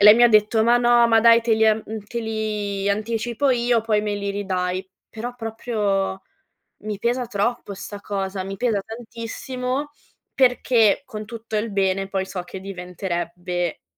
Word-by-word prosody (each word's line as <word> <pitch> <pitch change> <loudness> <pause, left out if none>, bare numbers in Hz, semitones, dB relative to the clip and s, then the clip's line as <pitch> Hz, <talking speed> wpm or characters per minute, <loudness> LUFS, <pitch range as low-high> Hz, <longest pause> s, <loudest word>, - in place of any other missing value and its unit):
e 200 - +5
lei 210 - +11
mi 240 - +4
ha 240 - +8
detto: 215 +1 +4
"Ma 235 +1 +5
no, 240 -1 +5
ma 225 -1 +5
dai, 230 +1 +7
te 230 -1 +2
li 220 0 +3
an 215 0 +3
uhm, 220 0 -5
te 235 +2 -4
li 210 -3 -2
anticipo 230 +6 0
io, 240 -2 +2
poi 215 -1 +1
me 210 -1 -1
li 200 0 -3
ridai". 185 -2 -2 0.2
Però 240 +2 -6
proprio 210 -4 -2 0.6
mi 210 -2 -4
pesa 245 +2 0
troppo 220 -1 -2
sta 200 +1 -8
cosa, 195 -2 -3
mi 195 +1 -6
pesa 220 -3 +1
tantissimo, 250 +5 -5 0.4
perché, 250 -3 +3
con 215 -4 -7
tutto 225 -1 -6
il 215 +2 -1
bene, 195 -1 0
poi 190 -1 -1
so 185 -2 -5
che 180 - -8
diventerebbe 180 -2 -4
215 Hz, 170 wpm, -23 LUFS, 195-235 Hz, 0.6 s, lei